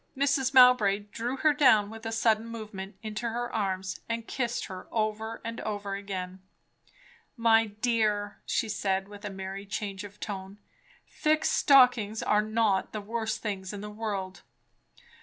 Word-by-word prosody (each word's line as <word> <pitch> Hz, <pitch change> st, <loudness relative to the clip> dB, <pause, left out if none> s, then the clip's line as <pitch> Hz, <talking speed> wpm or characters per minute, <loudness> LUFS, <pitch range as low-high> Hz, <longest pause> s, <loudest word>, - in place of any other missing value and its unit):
Mrs. 275 Hz, -1 st, +2 dB
Mowbray 250 Hz, -6 st, +6 dB
drew 240 Hz, +3 st, -3 dB
her 305 Hz, +2 st, +4 dB
down 235 Hz, -8 st, +4 dB
with 225 Hz, 0 st, -7 dB
a -, -, -3 dB
sudden 225 Hz, 0 st, +2 dB
movement, 215 Hz, -4 st, -7 dB
into 215 Hz, +2 st, -3 dB
her 240 Hz, +1 st, -3 dB
arms, 190 Hz, -3 st, -2 dB
and 230 Hz, 0 st, -2 dB
kissed 240 Hz, -2 st, -2 dB
her 185 Hz, -2 st, -9 dB
over 220 Hz, 0 st, -2 dB
and 230 Hz, 0 st, -4 dB
over 205 Hz, -2 st, -4 dB
again. 190 Hz, -2 st, -5 dB, 1.0 s
"My 225 Hz, -1 st, +4 dB
dear," 210 Hz, -2 st, 0 dB
she 230 Hz, -, 0 dB
said 195 Hz, -2 st, -1 dB
with 205 Hz, 0 st, -12 dB
a -, -, -3 dB
merry 195 Hz, +1 st, -6 dB
change 200 Hz, -1 st, -4 dB
of 205 Hz, 0 st, -11 dB
tone, 195 Hz, -1 st, -6 dB, 0.5 s
"thick 310 Hz, 0 st, +1 dB
stockings 245 Hz, -6 st, +4 dB
are 210 Hz, -, +3 dB
not 215 Hz, -2 st, +1 dB
the 215 Hz, -, -3 dB
worst 225 Hz, +1 st, -3 dB
things 195 Hz, -3 st, -4 dB
in 200 Hz, -, -6 dB
the 210 Hz, 0 st, -7 dB
world!" 200 Hz, -3 st, -4 dB
215 Hz, 155 wpm, -28 LUFS, 200-230 Hz, 1.0 s, Mowbray